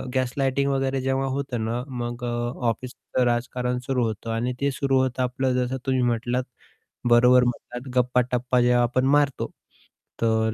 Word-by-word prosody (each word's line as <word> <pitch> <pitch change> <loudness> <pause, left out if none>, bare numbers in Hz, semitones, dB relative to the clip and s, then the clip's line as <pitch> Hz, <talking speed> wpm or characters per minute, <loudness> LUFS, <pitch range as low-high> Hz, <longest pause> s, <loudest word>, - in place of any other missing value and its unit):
Gaslighting 135 +2 +1
वगैरे, 135 -1 0
जेव्हा 135 +1 0
होतं 125 -5 -3
ना, 120 +2 -2 0.2
मग 120 +1 -5
अ, 120 - -2 0.4
ऑफिसचं 125 +2 -3
राजकारण 125 +1 -1
सुरू 130 -2 +1
होतं 110 +1 -4
आणि 120 +2 -1
ते 140 0 +2
सुरू 135 0 +1
होतं 130 0 0
आपलं, 130 +1 0
जसं 130 +2 -3
तुम्ही 130 -1 +1
म्हटलात, 120 +1 0 0.7
बरोबर 125 +1 +6
म्हणतात. 125 +1 -4
गप्पा-टप्पा 125 0 +2
जेव्हा 120 0 +4
आपण 130 +2 +1
मारतो, 140 -2 0 0.7
तर 110 -1 +2
125 Hz, 150 wpm, -24 LUFS, 120-130 Hz, 0.7 s, बरोबर